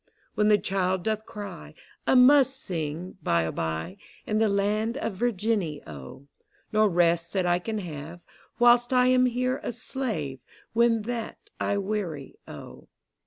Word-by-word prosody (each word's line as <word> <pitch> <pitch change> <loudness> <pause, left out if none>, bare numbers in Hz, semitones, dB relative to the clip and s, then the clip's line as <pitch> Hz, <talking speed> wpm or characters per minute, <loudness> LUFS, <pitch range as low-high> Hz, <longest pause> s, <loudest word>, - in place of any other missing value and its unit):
When 210 -1 +2
the 210 -1 +6
child 190 -2 -1
doth 220 0 -2
cry, 200 -5 -8 0.3
I - - +4
must 265 +1 +6
sing, 170 - -5
By 85 -1 +2
a 80 - -2
by, 80 +3 -4 0.3
In 215 0 0
the 220 -1 +3
land 210 +4 0
of 285 -8 -3
Virginny, 205 -7 -1
O: 75 - -10 0.5
No 215 0 +4
rest 170 -2 +2
that 190 -2 +1
I 175 0 +2
can 220 +4 -4
have 165 -2 -7 0.3
Whilst 240 0 +5
I 250 0 +4
am 255 0 +4
here 255 +1 -1
a - - -3
slave, 195 - -4 0.3
When 230 -1 +3
that 235 0 -6
I 200 - 0
weary, 195 -8 -4
O. - - -11
205 Hz, 155 wpm, -26 LUFS, 170-235 Hz, 0.5 s, the